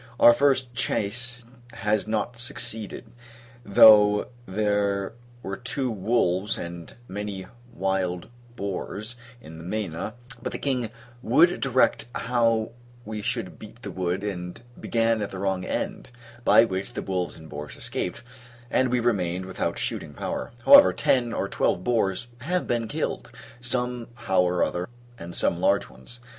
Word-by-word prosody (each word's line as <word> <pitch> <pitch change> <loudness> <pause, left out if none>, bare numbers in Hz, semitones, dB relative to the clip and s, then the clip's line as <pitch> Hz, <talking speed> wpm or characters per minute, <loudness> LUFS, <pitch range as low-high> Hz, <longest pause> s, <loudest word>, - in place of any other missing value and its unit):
Our 120 - +9
first 130 -2 +2
chasse 120 +2 -1 0.3
has 105 0 0
not 110 +2 -1
succeeded; 115 -3 -4 0.6
though 105 0 +7 0.2
there 100 0 0 0.3
were 95 0 -4
two 130 0 -2
wolves, 100 -2 +1
and 85 -1 -7 0.2
many 100 -1 -5 0.3
wild 95 -4 -1 0.3
boars, 100 +2 -4 0.3
in 80 -6 -11
the - - -9
Mena: 100 +1 -3 0.3
but - - -4
the - - -2
king 125 -5 -1 0.3
would 160 +10 +4
direct 130 -2 +2
how 115 -2 +1 0.3
we 110 0 -5
should - - -3
beat - - -12
the - - -5
wood, 90 +1 -2
and 90 -3 -4 0.2
began 115 -1 +1
at 105 - -2
the 95 - -7
wrong 95 -1 -1
end; - - -3 0.3
by 115 - +7
which 95 +3 -4
the - - -4
wolves 90 -2 -2
and 80 -1 -12
boars 75 -1 -8
escaped, 90 - -4 0.5
and 130 0 +3
we 125 0 +2
remained 95 -6 0
without 90 -2 -2
shooting - - -3
power. - - -4
However, 285 0 +9
ten 130 -5 +2
or 100 - -1
twelve 90 - 0
boars 110 -3 +1
have 175 +8 -1
been 120 -2 -1
killed, - - -3 0.3
some 125 -1 -2
how 95 -6 +2
or 90 0 +2
other, 90 +3 -2 0.3
and 85 +1 -7
some - - +1
large - - +2
ones. 65 - -13
105 Hz, 145 wpm, -26 LUFS, 95-120 Hz, 0.6 s, Our